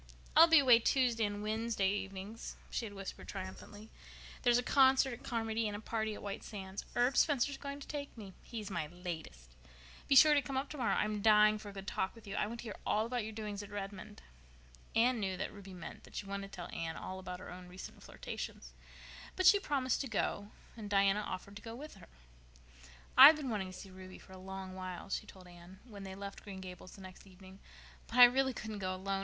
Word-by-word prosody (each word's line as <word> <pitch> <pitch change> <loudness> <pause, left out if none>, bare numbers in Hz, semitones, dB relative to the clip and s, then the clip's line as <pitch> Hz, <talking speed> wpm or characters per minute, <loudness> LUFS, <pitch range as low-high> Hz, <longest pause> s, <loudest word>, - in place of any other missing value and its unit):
"I'll 330 +1 +10
be 325 -1 +7
away 255 -5 +7
Tuesday 240 -2 +2
and 205 0 -4
Wednesday 220 -2 0
evenings," 195 +2 -5 0.2
she 235 - -2
had 205 - -10
whispered 195 -1 -7
triumphantly. 205 +2 -8 0.5
"There's 240 -2 +4
a 245 - 0
concert 265 -1 +5
at 235 - -9
Carmody 225 -2 -1
and 205 0 -3
a - - -8
party 220 0 -2
at - - -10
White 200 +1 -4
Sands. 195 -2 -7
Herb 245 +2 +3
Spencer's 285 -2 +2
going 280 0 -6
to - - -9
take 285 -4 -6
me. 200 -4 -9
He's 215 -4 -7
my 170 -4 -2
latest. 160 - -8 0.6
Be 275 - +4
sure 300 +3 +9
to 290 - +4
come 265 0 -4
up 275 +2 -2
tomorrow. 265 -6 0
I'm 210 -1 0
dying 215 0 +6
for 210 - -8
a - - -10
good 195 -1 -8
talk 190 +1 -2
with 230 - -14
you. 200 - -6
I 210 - 0
want 235 +2 -6
to - - -11
hear 215 -4 -7
all 215 +1 +1
about 245 +1 -2
your 220 - -5
doings 210 -2 -5
at 205 - -9
Redmond." 205 0 -7 0.7
Anne 240 +1 +4
knew 190 -3 -2
that - - -4
Ruby 195 -2 -10
meant 175 - -9
that - - -15
she - - -4
wanted 195 0 -5
to - - -9
tell 175 - -7
Anne 165 -1 -4
all 190 0 -6
about 180 -1 -7
her 185 - -9
own 180 0 -9
recent 180 +1 -10
flirtations, - - -7 0.6
but 370 - 0
she 405 - +8
promised 270 -8 0
to 275 - -3
go, 205 -2 -2 0.3
and 215 -3 -7
Diana 200 0 +4
offered 200 -1 -6
to - - -11
go 225 0 -8
with 300 +5 -9
her. 195 - -14 1.1
"I've 280 +5 +11
been 285 -5 -4
wanting 200 -3 -2
to 185 - -9
go - - -9
to - - -8
see 195 - -11
Ruby 185 0 -11
for 190 - -15
a 185 - -10
long 190 0 -7
while," 185 +1 -7
she 215 - -2
told 185 -3 -13
Anne, 175 +2 -14
when 205 -4 -10
they 190 0 -7
left 200 0 -7
Green 195 -3 -8
Gables 185 -1 -9
the 195 - -12
next 185 +1 -12
evening, 190 +1 -14 0.5
"but 235 - -5
I 250 - +11
really 265 +2 +6
couldn't 215 -2 -5
go 185 -1 -2
alone. 195 +1 -2
205 Hz, 230 wpm, -34 LUFS, 190-235 Hz, 1.1 s, I've